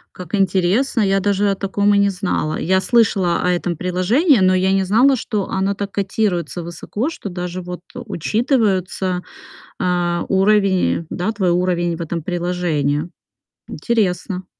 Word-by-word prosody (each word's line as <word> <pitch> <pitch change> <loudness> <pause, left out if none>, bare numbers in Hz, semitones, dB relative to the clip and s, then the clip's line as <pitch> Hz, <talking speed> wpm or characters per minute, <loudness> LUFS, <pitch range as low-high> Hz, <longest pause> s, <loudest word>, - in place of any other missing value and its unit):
Как 180 0 -10
интересно! 195 +6 +1
Я 195 -1 +2
даже 200 +1 +1
о - - -1
таком 200 +1 +1
и - - +3
не 200 0 +3
знала. 180 -5 -2
Я 190 +2 +1
слышала 200 -7 +2
о 180 - +1
этом 175 -2 -1
приложении, 210 - +2
но 185 0 +4
я 190 +1 +2
не 195 0 +2
знала, 240 +8 +4
что 215 -4 -3
оно 195 +1 0
так 200 0 -5
котируется 190 -3 -1
высоко, 205 - -4
что 210 -10 -7
даже 180 0 -5
вот 180 0 -7
учитываются, 200 - -1 0.6
а, 175 -1 0
уровень, 195 -4 +2
да, 180 +4 -2
твой 190 -4 0
уровень 175 -1 0
в - - -11
этом 170 0 -3
приложении. 170 -4 -1 0.6
Интересно. 185 -4 -1
190 Hz, 150 wpm, -19 LUFS, 175-205 Hz, 0.6 s, но